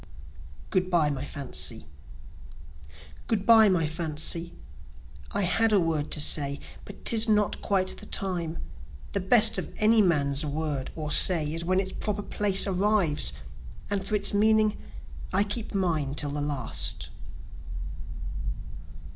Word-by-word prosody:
Good 185 -1 0
Bye 165 -5 +2
My 140 -1 -4
Fancy 140 - -1 1.4
Good 200 -4 -1
bye 225 -2 +6
my 175 -4 +1
fancy 160 +1 0 0.8
(I 200 - 0
had 225 +5 +2
a 205 - +4
word 160 -4 -1
to - - -1
say, 140 -1 +2 0.3
But 200 - -13
'tis 225 0 +6
not 210 -1 +1
quite 190 -2 0
the - - -4
time 170 -4 -3 0.5
The 200 - -1
best 215 +4 +4
of - - -7
any 220 +1 +4
man's 145 -6 +1
word 150 -2 -3
or 150 -2 -5
say, 155 -4 +4
Is 165 +1 -1
when 185 +2 +1
its 190 -1 -3
proper 205 -1 -2
place 200 -2 +1
arrives 195 - +1 0.6
and 200 -1 -1
for 205 +2 -2
its 205 - -1
meaning, 215 +1 +2 0.6
I 190 +2 +2
keep 210 +1 -3
mine 160 -7 -1
till 145 -1 -4
the 145 0 -4
last.) 130 - -3
180 Hz, 140 wpm, -26 LUFS, 150-205 Hz, 1.4 s, bye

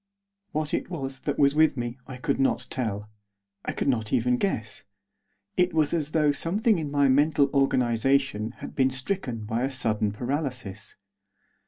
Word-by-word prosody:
What 155 0 -2
it - - -1
was 135 -6 -4
that 145 +1 -2
was 140 -1 +4
with 155 -2 +4
me 120 +1 -4
I 130 -1 -7
could 135 +2 -1
not 135 - +1
tell; 105 -4 -3 0.5
I - - -2
could - - -3
not 110 -5 0
even 125 +1 +2
guess. 115 - -2 0.7
It 180 -2 +2
was 155 -2 +2
as 155 -4 0
though 155 -2 +3
something 200 - +1
in 150 -2 -3
my 140 -1 +3
mental 140 +1 +3
organisation 130 -3 +2
had - - -9
been 130 -1 +3
stricken 130 - -3
by 110 +2 -1
a 135 - +1
sudden 110 -6 0
paralysis. 125 -3 -4
135 Hz, 165 wpm, -26 LUFS, 120-150 Hz, 0.7 s, was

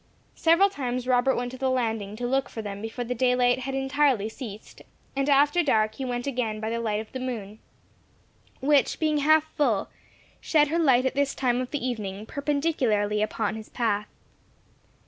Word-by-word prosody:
Several 340 +4 +4
times 255 -6 -3
Robert 255 +1 +3
went 245 0 -3
to 260 - -9
the 265 -1 +1
landing 225 -5 -1
to 245 +2 -4
look 265 +2 0
for 225 - -6
them 200 -1 -6
before 225 +3 -4
the 250 - -2
daylight 250 0 +2
had 265 +1 -4
entirely 270 -5 +1
ceased; 220 -3 -9 0.3
and 275 +1 0
after 290 +4 +4
dark 215 -8 +2
he 265 +4 -5
went 245 -1 -3
again 240 -6 -2
by 220 +1 -3
the 230 - -1
light 215 -2 -1
of 220 - -8
the 260 - -5
moon, 220 -5 -5 1.0
which, 285 +1 +2
being 310 -2 +1
half 310 +2 +4
full, 245 -10 +1 0.5
shed 300 -2 +2
her 335 +2 0
light 260 -5 +4
at 260 - +1
this 280 0 0
time 250 -1 +1
of 255 - -4
the 275 -4 -2
evening 210 -4 -4
perpendicularly 265 -8 0
upon 215 0 -1
his 220 -1 -9
path. 210 -3 -1
250 Hz, 185 wpm, -26 LUFS, 220-275 Hz, 1.0 s, Several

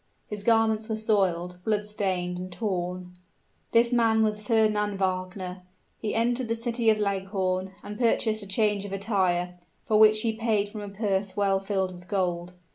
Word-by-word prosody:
His 210 -1 -6
garments 225 0 +2
were 220 - 0
soiled, 185 -5 0
blood 210 0 0
stained, 185 -4 -2
and 185 0 -6
torn. 180 -3 -3 0.6
This 235 +1 +4
man 225 -2 +4
was 210 -1 0
Fernand 210 -2 +1
Wagner. 185 -1 -3 0.4
He 215 - -2
entered 240 +2 +1
the 230 - 0
city 230 0 0
of 215 - +4
Leghorn, 190 -2 -1
and 210 +2 -7
purchased 225 -2 +2
a 200 - -8
change 205 0 +1
of 200 -1 -6
attire, 185 -3 0 0.3
for 215 -1 +3
which 215 0 +6
he 225 -1 +1
paid 220 -3 0
from 210 0 -7
a 205 - -6
purse 195 -1 -2
well 195 -1 +2
filled 190 -1 -1
with 180 0 -13
gold. 180 -3 -1
205 Hz, 170 wpm, -27 LUFS, 185-220 Hz, 0.6 s, which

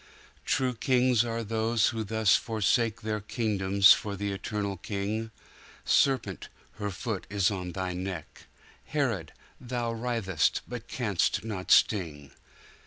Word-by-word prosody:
True 130 -1 +1
kings 125 -1 +3
are 115 -1 -3
those 110 +1 +1
who 115 -3 -3
thus 110 -1 +3
forsake 110 +1 +1
Their 110 0 -2
kingdoms 100 -3 +4
for 100 -1 -4
the 100 +1 -3
Eternal 100 0 -3
King; 105 +4 -3 0.6
Serpent, 125 -9 +1 0.3
her 105 -1 -2
foot 100 +1 -4
is 100 -1 +2
on 90 -3 -4
thy 95 -1 -3
neck; 90 -3 -6 0.4
Herod, 115 - -1 0.3
thou 120 -2 -3
writhest, 115 -8 0
but - - -7
canst - - 0
not 105 -5 -5
sting. 80 -9 +3
105 Hz, 125 wpm, -28 LUFS, 95-115 Hz, 0.6 s, kingdoms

